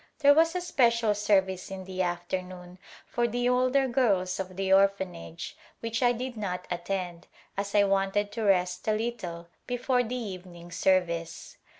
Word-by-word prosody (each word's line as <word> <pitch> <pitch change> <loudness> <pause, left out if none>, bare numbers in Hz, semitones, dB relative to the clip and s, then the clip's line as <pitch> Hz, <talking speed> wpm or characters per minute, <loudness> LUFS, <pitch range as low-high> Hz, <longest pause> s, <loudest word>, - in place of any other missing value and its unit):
There 285 -1 +6
was 330 +3 +3
a 360 - 0
special 235 -9 +3
service 190 -3 +1
in 190 -1 -6
the 185 0 -4
afternoon 180 0 -4 0.3
for 240 0 0
the 245 +1 -1
older 255 +2 +3
girls 200 -8 +1
of 185 -1 -5
the 190 0 +2
Orphanage 190 - 0 0.2
which 230 0 -3
I 245 -1 +5
did 245 +1 -4
not 180 -4 -4
attend 175 -1 -3 0.3
as 200 +1 -3
I 205 - +6
wanted 195 +1 +1
to 230 - -4
rest 180 -3 +1
a 215 - +3
little 215 -7 -4 0.2
before 245 +1 +1
the 245 +1 -3
evening 180 -6 -7
service. 170 -2 0
195 Hz, 160 wpm, -28 LUFS, 180-235 Hz, 0.3 s, There